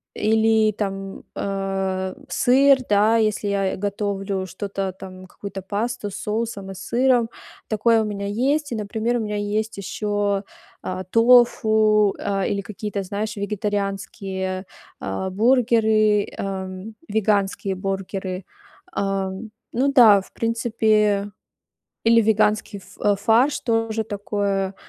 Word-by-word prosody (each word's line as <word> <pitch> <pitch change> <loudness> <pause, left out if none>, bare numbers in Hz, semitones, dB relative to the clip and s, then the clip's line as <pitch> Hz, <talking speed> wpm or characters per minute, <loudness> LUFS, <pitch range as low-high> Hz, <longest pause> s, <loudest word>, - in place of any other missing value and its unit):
или, 220 0 +3
там, 195 -1 -5
а, 195 -1 -2
сыр, 270 +2 +4
да, 210 +3 +4
если 215 -1 0
я 195 -1 0
и - - -3
готовлю 200 -1 -2
что-то 195 0 -4
там, 185 -1 -10
какую-то 195 +1 -8
пасту 205 +2 -3
с - - -8
соусом 210 -3 -3
и - - -6
сыром. 245 +1 +1 0.4
Такое 225 +1 +3
у - - -1
меня 200 -1 -4
есть. 275 +7 0
И, - - -1
например, 220 +3 -1
у - - -2
меня 210 -1 -3
есть 210 +1 -2
ещё, 205 0 -1 0.4
а, 185 0 -4
тофу, 220 -2 +4
а, 195 -1 -1
или 200 -1 -1
какие-то, 205 0 -5
знаешь, 210 +3 -4
вегетарианские, 195 -2 -3 0.3
а, 95 - -3
бургеры, 220 -1 +3
ам, 190 +2 -5
веганские 200 -2 0
бургеры. 190 -1 -4 0.5
А, 195 -1 -1 0.4
ну 275 +3 +1
да, 215 -7 +7
в - - -18
принципе, 215 -3 +1 0.7
или 230 0 +5
веганский 210 -1 +1
ф 200 +1 -1
фарш 235 +7 +3
тоже 225 -2 0
такое, 200 -2 -2
205 Hz, 120 wpm, -22 LUFS, 195-220 Hz, 0.7 s, да